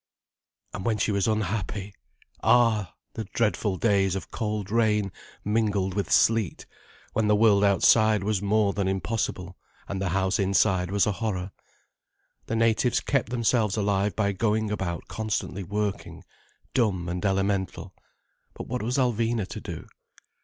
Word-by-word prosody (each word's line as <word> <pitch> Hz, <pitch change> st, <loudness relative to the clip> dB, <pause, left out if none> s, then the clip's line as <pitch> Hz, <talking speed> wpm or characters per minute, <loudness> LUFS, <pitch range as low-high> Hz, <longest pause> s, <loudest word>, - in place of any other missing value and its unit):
And -, -, -5 dB
when 110 Hz, +1 st, 0 dB
she 105 Hz, -, 0 dB
was 100 Hz, -2 st, +1 dB
unhappy! 105 Hz, -1 st, -2 dB, 0.5 s
Ah, 115 Hz, -6 st, +3 dB, 0.2 s
the 110 Hz, -, -5 dB
dreadful 105 Hz, -3 st, 0 dB
days 95 Hz, -4 st, +2 dB
of 95 Hz, -, -6 dB
cold 105 Hz, -3 st, -3 dB
rain 105 Hz, -3 st, +2 dB, 0.3 s
mingled 105 Hz, -3 st, 0 dB
with 95 Hz, -4 st, -2 dB
sleet, 110 Hz, -5 st, +2 dB, 0.5 s
when 110 Hz, -1 st, +1 dB
the 105 Hz, -, +4 dB
world 105 Hz, -2 st, +4 dB
outside 105 Hz, +1 st, +4 dB
was 105 Hz, -1 st, 0 dB
more 105 Hz, 0 st, +2 dB
than 100 Hz, -2 st, -1 dB
impossible, 95 Hz, -2 st, -3 dB, 0.3 s
and 95 Hz, -1 st, -4 dB
the 95 Hz, -, -1 dB
house 95 Hz, +3 st, 0 dB
inside 95 Hz, -2 st, +2 dB
was 100 Hz, 0 st, +2 dB
a 105 Hz, -, +1 dB
horror. 95 Hz, -3 st, -3 dB, 1.0 s
The 115 Hz, -, -2 dB
natives 115 Hz, +2 st, +2 dB
kept 140 Hz, -5 st, -1 dB
themselves 115 Hz, -3 st, +1 dB
alive 100 Hz, -2 st, 0 dB
by 100 Hz, +2 st, +1 dB
going 105 Hz, +1 st, 0 dB
about 90 Hz, -5 st, -3 dB
constantly 110 Hz, -3 st, -3 dB
working, 105 Hz, +2 st, -4 dB, 0.5 s
dumb 100 Hz, -8 st, +1 dB
and 90 Hz, +1 st, -3 dB
elemental. 95 Hz, -1 st, -1 dB, 0.6 s
But -, -, -7 dB
what 125 Hz, +1 st, -3 dB
was 120 Hz, +5 st, -1 dB
Alvina 115 Hz, -4 st, 0 dB
to -, -, -7 dB
do? -, -, -7 dB
105 Hz, 145 wpm, -26 LUFS, 95-110 Hz, 1.0 s, the